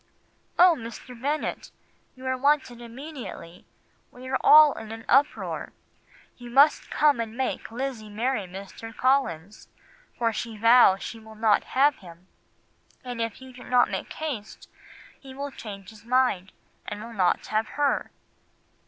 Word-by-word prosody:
"'Oh, 355 -1 +7
Mr. 235 +1 -10
Bennet, 295 +3 -2 0.5
you 260 0 -12
are 260 0 0
wanted 260 -3 +1
immediately; 240 - -9 0.4
we 255 +1 -12
are 265 - +1
all 305 -1 +8
in 220 -1 -9
an 225 0 -8
uproar. 280 +3 +1 0.6
You 245 -1 -10
must 280 +5 +4
come 295 -4 +3
and 225 0 -4
make 265 - -2
Lizzie 240 -2 -5
marry 220 -1 -2
Mr. 200 +4 -10
Collins, 215 - 0 0.5
for 230 -1 0
she 225 0 -5
vows 230 -3 +6
she 230 - -7
will 220 0 -14
not 215 -1 +3
have 285 +1 +4
him; 175 -1 -15 0.8
and 245 -2 -5
if 230 +3 -4
you 260 -1 -12
do 250 - -12
not 250 0 +3
make - - -4
haste 275 -10 -6 0.5
he 265 -1 -12
will 280 +1 -5
change 200 -6 -9
his 215 -1 -16
mind 240 -7 +1 0.4
and - - -5 0.2
not 185 -3 +1
have 215 +1 -1
her. 290 -1 +1
240 Hz, 145 wpm, -26 LUFS, 215-265 Hz, 0.8 s, all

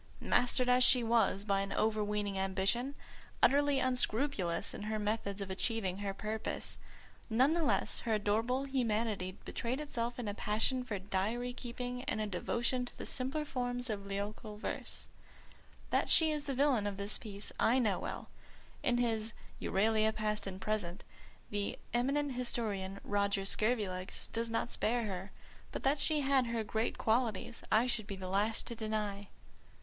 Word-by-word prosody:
Mastered 250 0 +3
as 250 0 +6
she 250 -1 +7
was 225 -3 +3
by 195 -2 +2
overweening 210 0 0
ambition, 195 +8 0 0.5
utterly 285 0 +5
unscrupulous 250 -7 +1
in - - -6
her 215 +1 -2
methods 210 -1 -1
of 195 -1 -4
achieving 195 -1 -1
her 200 -1 -1
purpose, 215 +2 -3 0.5
none 255 +7 +4
the 340 - +1
less 300 - +1
her 230 - -1
adorable 225 +6 +1
humanity 220 -7 0
betrayed 245 +4 -2
itself 240 -5 -3
in 245 -3 -4
a 205 - -1
passion 225 +5 +1
for 225 -5 -3
diary 205 +6 -1
keeping 245 0 -5
and - - -1
a 215 - 0
devotion 235 +6 -1
to 245 - -7
the - - -6
simpler 270 +4 -1
forms 245 -3 -2
of 200 -2 -4
lyrical 210 +2 -4
verse. 215 - -3 0.8
That - - +2
she 320 -1 +6
is 300 -1 -2
the 275 - -2
villain 260 -6 +3
of 200 -1 -3
the 200 +1 -2
piece 205 -2 -3
I 240 +3 +4
know 215 -7 +2
well; - - -5 0.5
in 245 -4 +2
his 225 -2 0 0.3
Euralia 220 +2 +2
Past 210 -1 0
and 190 -1 -5
Present 195 -3 -2 0.5
the 205 -1 -1 0.2
eminent 275 +4 +1
historian, 215 -6 -2
Roger 200 -1 +1
Scurvilegs, 200 -4 -1
does 230 0 -1
not 230 +1 -1
spare 235 +2 +1
her; 195 -2 -4 0.4
but - - -5
that 280 +2 +3
she 305 0 +1
had 270 -2 +3
her 230 -1 -1
great 220 +2 -1
qualities 230 -1 0
I 220 +3 +5
should 225 -4 0
be 200 - -4
the 185 -1 -6
last 205 +4 +1
to - - -4
deny. 210 -2 -2
220 Hz, 160 wpm, -34 LUFS, 205-250 Hz, 0.8 s, she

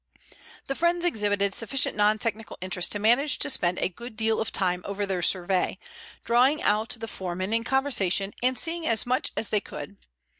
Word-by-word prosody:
The 275 - -2
friends 345 +3 +1
exhibited 205 - +1
sufficient 255 +6 0
non 210 +1 +3
technical 220 0 -4
interest 185 -1 -1
to - - -1
manage 240 +8 +3
to - - +1
spend 180 -8 0
a - - +1
good 225 +5 -10
deal 220 0 +1
of 225 - -2
time 180 -1 0
over 200 0 -3
their 190 -2 -2
survey, 185 +1 +1 0.5
drawing 255 +6 +4
out 215 +3 +1
the 225 - -5
foreman 185 0 -4
in 230 0 +2
conversation 220 -7 +1
and 255 +1 +1
seeing 330 0 -2
as 225 -2 +1
much 250 +1 0
as 225 - 0
they 210 - +1
could. 145 - -9
215 Hz, 185 wpm, -26 LUFS, 195-250 Hz, 0.5 s, drawing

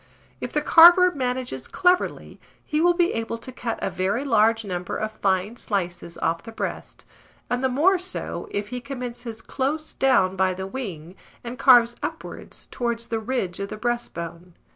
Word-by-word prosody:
If - - -5
the - - 0
carver 350 +2 +8
manages 250 - -3
cleverly, 360 -1 0 0.3
he 300 +1 0
will 350 +1 +4
be 345 -1 +2
able 225 0 -3
to 230 +3 -9
cut 235 -2 -4
a - - -1
very 195 +9 -1
large 225 -2 +3
number 180 -2 -4
of 215 0 -3
fine 200 +1 -1
slices 175 -5 -3
off 165 +1 -1
the 225 - -10
breast, 225 - -6 0.5
and 245 +1 0
the 260 - +3
more 340 +9 +3
so 365 +1 -5
if 205 0 -3
he 250 0 -5
commences 245 -3 -7
close 300 +4 -2
down 195 -9 +3
by 190 -1 +1
the 190 +1 -5
wing, 190 -8 -6 0.3
and 240 0 -7
carves 240 -2 +6
upwards - - -7
towards 235 -2 -2
the 225 - -1
ridge 220 -6 -2
of 200 0 -4
the - - -6
breastbone. 180 -7 -4
235 Hz, 170 wpm, -24 LUFS, 190-260 Hz, 0.5 s, carver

